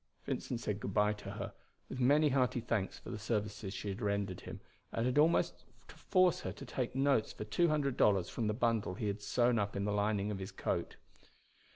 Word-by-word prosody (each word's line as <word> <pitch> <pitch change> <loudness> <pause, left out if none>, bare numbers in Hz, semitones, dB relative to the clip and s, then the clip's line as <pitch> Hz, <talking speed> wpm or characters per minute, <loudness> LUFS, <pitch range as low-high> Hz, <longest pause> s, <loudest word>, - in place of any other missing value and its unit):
Vincent 120 - -3
said 105 -3 -2
good 100 -2 -5
by 105 0 +4
to 105 - -9
her, - - -5 0.3
with 130 - -6
many 145 +4 +5
hearty 130 -2 +2
thanks 110 -4 -1
for - - -9
the 110 - -5
services 105 -2 -2
she 105 - -4
had 100 +4 -5
rendered 100 -3 -1
him, - - -8 0.3
and 115 - -1
had 125 +3 +2
almost 160 +3 +3 0.2
to - - -12
force 185 -3 +3
her - - -4
to - - -9
take 125 -1 -3
notes 135 -4 +2
for - - -6
two 170 +10 +2
hundred 145 -4 +1
dollars 95 -4 +4
from 115 - -2
the 105 - +1
bundle 115 -5 +1
he 110 - -4
had 100 0 -2
sewn 120 +1 +2
up 100 0 -1
in 100 0 -1
the 105 - 0
lining 105 0 +1
of 100 - -4
his 95 +1 -6
coat. 95 - -2
110 Hz, 220 wpm, -34 LUFS, 100-125 Hz, 0.3 s, many